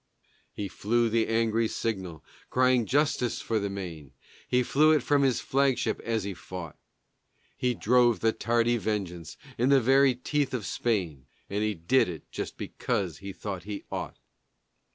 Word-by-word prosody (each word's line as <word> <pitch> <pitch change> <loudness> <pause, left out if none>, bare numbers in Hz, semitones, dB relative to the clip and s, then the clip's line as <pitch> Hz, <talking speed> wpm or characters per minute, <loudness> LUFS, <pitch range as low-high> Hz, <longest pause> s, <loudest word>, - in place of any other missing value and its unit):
He 100 - -4
flew 115 +6 +1
the 115 0 +2
angry 115 0 +1
signal 95 -9 -4 0.3
crying 125 -3 +3
justice 135 -4 +1
for 110 -1 -1
the 100 -1 -2
Maine, 85 -8 -7 0.3
He 125 0 +2
flew 150 +5 +4
it 150 -5 +2
from 145 +1 +3
his 130 -4 +2
flagship 135 -2 +1
as 115 -3 -2
he 100 0 -4
fought. 85 -2 -8 0.8
He 125 -1 0
drove 120 -1 +3
the 115 +3 +3
tardy 120 +2 +1
vengeance 95 -7 -4 0.2
in 125 +3 +3
the 140 -1 +6
very 135 +1 +4
teeth 140 +2 -1
of 110 -5 -4
Spain, 85 - -2 0.2
And 100 +1 -1
he 105 -1 0
did 90 +8 +2
it 80 -4 -7
just - - -5
because 90 -5 -3
he 100 0 -7
thought 95 -1 -6
he 105 -1 -5
ought. - - -4
115 Hz, 160 wpm, -28 LUFS, 95-125 Hz, 0.8 s, the